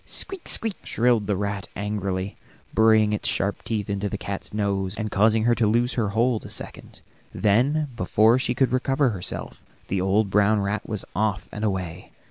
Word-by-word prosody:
"Squeak, 380 -2 -3
squeak," 225 -4 +2
shrilled 115 -3 +1
the 105 - +1
rat 100 0 -3
angrily, 100 -1 -3 0.4
burying 110 -1 +4
its 105 - -1
sharp 100 +1 -1
teeth 105 -3 -2
in 100 -1 -2
the 105 +1 -2
cat's 100 -1 -6
nose, 100 -2 -1
and 110 -2 -3
causing 110 +2 +3
her 120 +1 +4
to 115 -2 +2
loose 120 +3 +2
her 110 -5 0
hold 115 +2 +1
a - - -9
second. - - -5 0.3
Then, 135 +9 +2
before 115 +2 +3
she 125 -1 -1
could 135 0 +2
recover 135 +1 +2
herself, 95 -4 -5 0.3
the 95 -1 0
old 100 +2 +1
brown 105 +1 +3
rat 100 +2 -2
was 105 -3 -2
off 105 -2 0
and 105 - -6
away. 95 -4 -3
105 Hz, 180 wpm, -24 LUFS, 100-115 Hz, 0.4 s, burying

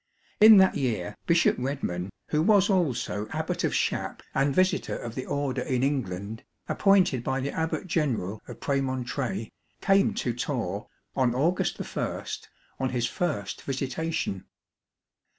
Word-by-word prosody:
In 215 0 +10
that 190 -1 +5
year 115 -10 -1
Bishop 170 -1 +4
Redman, 125 -9 -2 0.2
who 150 - +2
was 200 +2 +4
also 130 - 0
Abbot - - -2
of - - +1
Shapp - - -1
TORRE - - -29
ABBEY 135 - +3
and 140 - -1
visitor 185 0 +2
of 115 - -6
the 130 - -5
Order 140 -2 -1
in 130 -1 0
England, 110 -6 -2 0.2
appointed 185 - +3
by 130 +1 -1
the 135 +2 -2
abbot 160 +3 -2
general 125 - -1
of - - -9
Premontre, 135 +6 -2 0.3
came 195 0 +3
to 120 - -1
Torre, 120 - -3 0.3
on 125 -2 +2
August 165 +8 +1 0.2
I, - - -2 0.6
on 130 - 0
his 120 -2 0
first 130 - -2
visitation. 135 - -2
135 Hz, 145 wpm, -27 LUFS, 120-165 Hz, 0.6 s, In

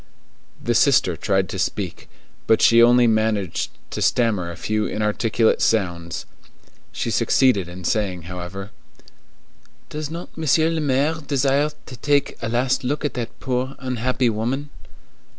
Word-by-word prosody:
The 120 - -1
sister 115 - +4
tried 95 +1 0
to 95 - -5
speak, 95 -2 -3 0.4
but 110 - +4
she 115 0 +6
only 120 +1 +6
managed 110 -5 0 0.2
to - - -4
stammer 105 -8 +1
a 85 - -8
few 105 +3 -1
inarticulate 110 +1 +1
sounds. 85 -6 0 0.7
She - - -3
succeeded 105 -10 +2
in 90 +1 -9
saying, 95 -2 -1
however:— 90 +3 -7 1.2
"Does 150 -1 -5
not 170 +2 -8
Monsieur 160 +1 +2
le 165 -1 -1
Maire 145 +3 +1
desire 140 +1 +2 0.2
to 130 - -9
take 140 +3 +1
a 115 - -2
last 125 +3 +1
look 145 +4 -2
at 145 - -1
that 115 -1 -6
poor, 130 +1 -2
unhappy 125 -1 0
woman?" 130 +7 -3
115 Hz, 140 wpm, -22 LUFS, 100-135 Hz, 1.2 s, she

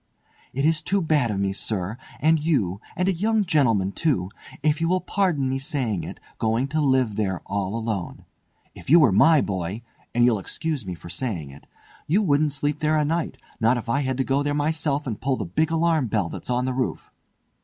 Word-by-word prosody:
"It 135 +3 -1
is 160 -1 +3
too 200 +1 +1
bad 155 -8 +2
of 100 -2 -2
me, 100 0 0
sir, 100 0 -2 0.2
and 160 +1 +3
you—and 145 - -1
a 195 - +3
young 215 +4 +1
gentlemen, 115 - +2
too—if 150 - -2
you 165 - +2
will 185 +1 +2
pardon 180 -7 0
me 135 +1 -1
saying 130 - -2
it, - - -8 0.2
going 115 +3 +1
to 155 +2 0
live 130 -7 +2
there 95 -4 -1
all 100 +1 -2
alone. 110 -6 -4 0.5
If - - -11
you 170 +4 +8
were 140 -9 +5
my 155 - +5
boy—and 105 +6 -2
you'll 115 -4 +3
excuse 145 - -4
me 90 - -4
for 85 - -11
saying 90 - -4
it—you 155 - -4
wouldn't 150 -3 +2
sleep 145 +1 -1
there 155 0 +2
a 150 - +2
night, 165 +2 -1 0.2
not 115 +2 +3
if 120 0 -6
I 135 - +2
had 130 -2 -1
to 135 - +1
go 135 +2 +1
there 145 0 -1
myself 150 -1 0
and 115 -6 -4
pull 135 -1 0
the - - -3
big 120 - 0
alarm 165 -4 +2
bell 105 -5 0
that's - - -8
on 125 0 +1
the 130 - -1
roof!" 130 0 -3
135 Hz, 200 wpm, -24 LUFS, 110-155 Hz, 0.5 s, you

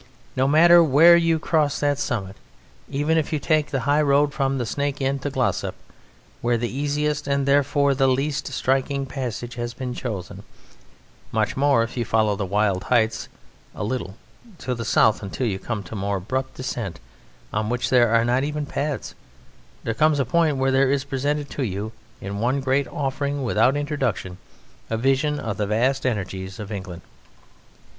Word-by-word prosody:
No 130 +1 +2
matter 170 +4 +7
where 160 +4 +7
you 165 -1 +3
cross 155 -2 +1
that 145 -1 +1
summit, 100 -8 -3 0.5
even 150 +4 +1
if 155 - -3
you 155 - +1
take 155 0 +1
the 135 - -1
high 145 +4 +2
road 145 0 +3
from 135 -2 0
the 125 - -2
Snake 140 +3 -2
Inn 135 0 0
to 145 - -3
Glossop, 130 -3 -1 0.7
where 120 0 +1
the 120 +2 -3
easiest, 150 +1 -1
and 140 -1 +1
therefore 140 0 +3
the 135 0 +2
least 135 +3 0
striking, 135 +1 0
passage 125 -3 -5
has 120 0 -4
been 125 0 -4
chosen, 105 -8 -5 0.9
much 110 -1 0
more 140 -4 +3
if 115 +2 -6
you 120 - +1
follow 110 -2 +1
the 100 -1 -3
wild 100 -1 0
heights 110 -3 +1 0.5
a - - -4
little 105 -4 -3 0.4
to 125 -4 -3
the 115 -1 -4
south 110 - +3
until 100 +5 -3
you 100 -4 -1
come 110 -2 -4
to 85 - -10
a - - -4
more 100 0 -1
abrupt 130 +8 -3
descent 120 -7 -4 0.5
on 105 0 -1
which 125 0 -1
there 120 -2 +5
are 115 +1 +3
not 125 +2 +2
even 150 0 -2
paths, 145 0 -3 0.7
there 115 - -1
comes 155 +5 +3
a 135 - +2
point 155 +1 +2
where 135 0 +1
there 135 0 +3
is 140 -1 +1
presented 145 +1 -2
to - - -4
you 105 -2 -3 0.3
in 100 +1 -5
one 125 +5 +1
great 135 +1 +1
offering, 140 0 -2
without 130 +2 +2
introduction, 145 -11 -2 0.5
a 115 - -1
vision 135 +4 +1
of 105 -3 -4
the 105 - -1
vast 130 +6 +1
energies 95 -4 -4
of 105 0 -7
England. 95 -4 -6
130 Hz, 180 wpm, -23 LUFS, 110-145 Hz, 0.9 s, matter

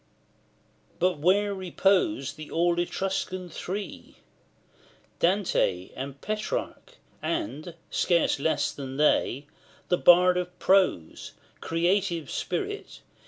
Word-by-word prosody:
LVI. - - -38
But 180 -1 +1
where 200 +5 +3
repose 185 -6 +1
the 155 0 -10
all 170 +1 +1
Etruscan 185 0 -2
three 195 +5 -6 1.0
Dante, 170 - +1
and 140 +1 -6
Petrarch, 215 - -4 0.3
and, 240 - -3 0.2
scarce 170 -4 +2
less 160 +3 +1
than 135 -1 -7
they, 145 -2 +2 0.4
The 180 - +2
Bard 180 +1 +6
of 180 0 -4
Prose, 185 - +1 0.3
creative 170 -1 0
spirit! 415 +1 -4
180 Hz, 100 wpm, -27 LUFS, 155-195 Hz, 1.0 s, Bard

